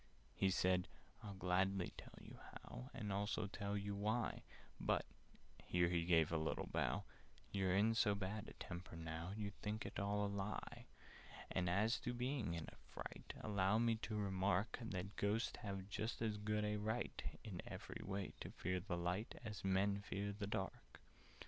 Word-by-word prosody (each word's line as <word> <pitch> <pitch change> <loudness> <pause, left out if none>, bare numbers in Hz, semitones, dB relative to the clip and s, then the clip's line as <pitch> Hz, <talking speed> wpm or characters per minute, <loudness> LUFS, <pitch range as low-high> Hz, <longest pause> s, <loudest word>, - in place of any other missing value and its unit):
He 95 - +3
said 90 -1 +3 0.4
"I'd 100 -2 -5
gladly 95 +1 +2
tell - - -10
you - - -10
how, 125 - -7
And 105 -6 -2
also 105 +1 +1
tell 100 0 -2
you 100 0 -1
why; 110 +3 +1 0.4
But" - - +2 0.6
(here 85 -1 +3
he 85 -1 +2
gave 80 -3 +5
a 80 - +3
little 80 - 0
bow) - - +1 0.5
"You're 95 -2 +3
in 110 +3 +5
so 105 -2 +4
bad 100 +2 -2
a - - -8
temper 85 0 -6
now, 80 +2 -3
You'd 100 -2 -4
think 105 +1 -1
it - - -3
all 100 +1 +2
a - - +2
lie. 100 +1 -3 0.6
"And 90 -2 +2
as 105 +6 +4
to 120 -1 -2
being 125 -7 0
in 80 -2 -3
a - - -16
fright, - - -6
Allow 100 -1 +3
me 115 0 +5
to 110 -1 -2
remark 100 +1 +2
That 100 -3 -3
Ghosts 105 +3 +2
have 95 -2 -3
just 110 +3 -2
as 110 -2 +1
good 105 0 +1
a 105 0 +1
right 110 +3 -1 0.2
In 95 -6 -4
every - - -5
way, 100 0 -2
to - - -4
fear 90 +1 -1
the 90 -1 -2
light, 90 +5 0
As 105 -4 -4
Men 95 +1 +4
to - - -6
fear 100 +1 -1
the 100 0 -3
dark." 95 - -3
100 Hz, 180 wpm, -42 LUFS, 95-105 Hz, 0.6 s, gave